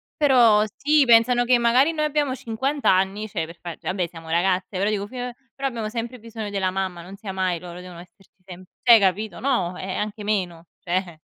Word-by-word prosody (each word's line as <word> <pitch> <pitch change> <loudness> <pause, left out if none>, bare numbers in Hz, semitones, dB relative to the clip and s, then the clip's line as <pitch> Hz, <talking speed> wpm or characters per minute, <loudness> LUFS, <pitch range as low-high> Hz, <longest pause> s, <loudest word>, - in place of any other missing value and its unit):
Però 245 -8 +5
sì 295 0 +3
pensano 240 +1 +5
che 245 0 +4
magari 245 +6 +3
noi 305 -2 -1
abbiamo 295 -3 0
50 265 +5 0
anni, 195 +3 0
cioè 170 -5 -3
per 170 - -12
far 175 -1 -7
vabbè 185 -1 -1
siamo 165 -1 -12
ragazze, 185 +3 0
però 200 +2 +1
dico 205 -1 -2
fi 255 - -13
ehm, 245 0 -4 0.2
però 275 0 -2
abbiamo 225 -4 -4
sempre 235 +2 -5
bisogno 225 -2 -7
della 195 -2 0
mamma, 185 -2 -3
non 185 +3 -10
sia 200 -1 -7
mai 185 -2 -1
loro, 175 0 -9
devono 180 -1 -10
esserci 185 +2 -21
sempre 185 0 -12
cioè 240 - +8
hai 230 - +8
capito 200 +2 0
no, 235 -10 0
eh, - - -7
ehm, - - -3
anche 210 0 -4
meno, 180 -5 -2
cioè 175 -2 -3
205 Hz, 215 wpm, -23 LUFS, 185-240 Hz, 0.2 s, cioè